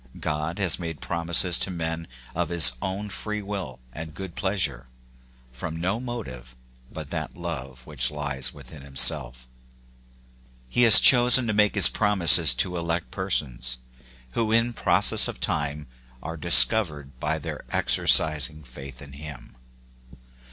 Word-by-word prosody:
God 75 Hz, +2 st, -5 dB
has 95 Hz, -4 st, -1 dB
made 80 Hz, -4 st, -8 dB
promises 85 Hz, +2 st, 0 dB
to -, -, -1 dB
men 80 Hz, -2 st, -6 dB, 0.3 s
of 85 Hz, -1 st, -4 dB
his 85 Hz, -7 st, +5 dB
own 95 Hz, +2 st, -6 dB
free 105 Hz, +1 st, -7 dB
will 95 Hz, -11 st, -8 dB
and 80 Hz, +1 st, -11 dB
good 95 Hz, -3 st, -10 dB
pleasure, 90 Hz, -12 st, -4 dB, 0.7 s
from 80 Hz, +6 st, -8 dB
no 95 Hz, +6 st, -4 dB
motive 65 Hz, -, -10 dB, 0.4 s
but -, -, -11 dB
that -, -, -7 dB
love 65 Hz, -7 st, -9 dB
which 70 Hz, -5 st, -2 dB
lies 70 Hz, -4 st, -5 dB
within 70 Hz, 0 st, -15 dB
himself. 65 Hz, -1 st, -3 dB, 1.2 s
He 120 Hz, -, -3 dB
has 110 Hz, -, +11 dB
chosen 125 Hz, 0 st, +6 dB
to 110 Hz, -, -3 dB
make 105 Hz, 0 st, 0 dB
his 100 Hz, -, +8 dB
promises 85 Hz, -, +4 dB
to 90 Hz, +7 st, -1 dB
elect 85 Hz, 0 st, -5 dB
persons, 65 Hz, -10 st, -4 dB, 0.5 s
who 110 Hz, -, -4 dB
in 115 Hz, +1 st, 0 dB
process -, -, +3 dB
of -, -, -9 dB
time 75 Hz, +1 st, -4 dB, 0.4 s
are 80 Hz, -, -8 dB
discovered 75 Hz, -, +4 dB
by 75 Hz, +3 st, -3 dB
their 75 Hz, -, -9 dB
exercising 75 Hz, -1 st, +1 dB
faith 65 Hz, 0 st, -13 dB
in 70 Hz, -1 st, -15 dB
him. 70 Hz, -4 st, -13 dB
80 Hz, 135 wpm, -22 LUFS, 70-95 Hz, 1.2 s, has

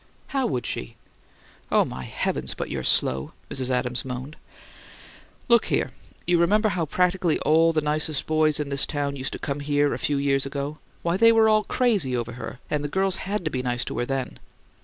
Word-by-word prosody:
"How 270 Hz, -2 st, 0 dB
would 125 Hz, -3 st, -2 dB
she?" -, -, -4 dB, 0.8 s
"Oh, -, -, +4 dB
my 65 Hz, 0 st, -6 dB
heavens, -, -, -2 dB
but -, -, -4 dB
you're -, -, -3 dB
slow!" 65 Hz, +1 st, +3 dB, 0.2 s
Mrs. 130 Hz, -3 st, -1 dB
Adams 125 Hz, -1 st, -1 dB
moaned. 130 Hz, +3 st, -6 dB, 1.1 s
"Look 235 Hz, -2 st, +5 dB
here! -, -, 0 dB, 0.3 s
You 175 Hz, -1 st, +3 dB
remember 210 Hz, +5 st, +3 dB
how 170 Hz, -5 st, -1 dB
practically 180 Hz, 0 st, +2 dB
all 165 Hz, +2 st, +4 dB
the 155 Hz, -1 st, +1 dB
nicest 150 Hz, 0 st, -1 dB
boys 155 Hz, -1 st, +2 dB
in 145 Hz, -1 st, -2 dB
this 140 Hz, 0 st, +1 dB
town 145 Hz, -1 st, -2 dB
used 135 Hz, 0 st, -3 dB
to -, -, -4 dB
come 140 Hz, 0 st, -3 dB
here 145 Hz, 0 st, +1 dB
a -, -, -4 dB
few 145 Hz, -, 0 dB
years 140 Hz, -1 st, +1 dB
ago. 140 Hz, +2 st, -4 dB, 0.2 s
Why, 170 Hz, +1 st, +1 dB
they 230 Hz, +2 st, +7 dB
were 225 Hz, -1 st, +5 dB
all 215 Hz, -1 st, +3 dB
crazy 200 Hz, -, +1 dB
over 120 Hz, 0 st, -3 dB
her; 125 Hz, +1 st, -7 dB
and 150 Hz, -1 st, -1 dB
the -, -, -1 dB
girls 190 Hz, +4 st, 0 dB
HAD 205 Hz, -3 st, -2 dB
to 155 Hz, -, -1 dB
be 130 Hz, -, -1 dB
nice 125 Hz, -1 st, -1 dB
to -, -, -5 dB
her 120 Hz, -, 0 dB
then. 135 Hz, -2 st, -3 dB
150 Hz, 200 wpm, -25 LUFS, 135-175 Hz, 1.1 s, they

